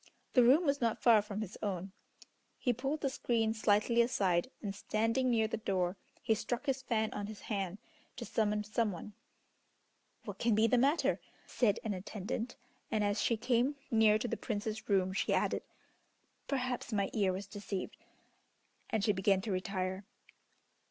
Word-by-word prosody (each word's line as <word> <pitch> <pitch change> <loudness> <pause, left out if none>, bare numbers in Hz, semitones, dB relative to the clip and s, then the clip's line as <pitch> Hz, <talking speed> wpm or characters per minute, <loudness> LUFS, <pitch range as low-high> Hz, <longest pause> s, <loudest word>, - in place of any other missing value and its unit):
The 250 - +6
room 270 +9 +6
was 280 -1 +1
not 230 -2 +1
far 225 -3 +6
from 210 0 -5
his 215 -3 -6
own. 195 -2 -3 0.7
He 245 - +1
pulled 270 +6 -2
the 275 - +1
screen 225 -4 +1
slightly 220 +2 +3
aside, 195 -6 +1
and 200 -3 -4
standing 225 +5 0
near 225 -2 +3
the 225 - -3
door, 185 -4 0 0.3
he 220 - +3
struck 235 +5 -3
his 270 -2 0
fan 220 -4 0
on 205 - -4
his 215 -1 -9
hand, 195 -3 -3 0.4
to - - -6
summon 210 -1 0
some 215 +1 0
one. 190 +4 -8 1.1
"What - - -7
can 230 -2 +3
be 220 +1 +4
the 235 +2 +4
matter," 285 +6 +2 0.3
said 210 -5 +1
an 220 -3 -1
attendant, 210 +5 -4 0.3
and 215 -1 +1
as 205 0 +1
she 230 - +2
came 245 +4 +1 0.2
near 220 -2 +5
to 235 - -3
the - - -2
Prince's 220 -1 -4
room 190 -2 +2
she - - +1
added, - - +1 0.9
"Perhaps 255 -3 -2
my 200 -2 0
ear 200 -4 +2
was 190 +2 -4
deceived," 200 -1 -5 0.9
and 220 -4 0
she 210 - +4
began 195 0 +2
to 205 - -4
retire. 185 0 -2
215 Hz, 170 wpm, -33 LUFS, 200-235 Hz, 1.1 s, The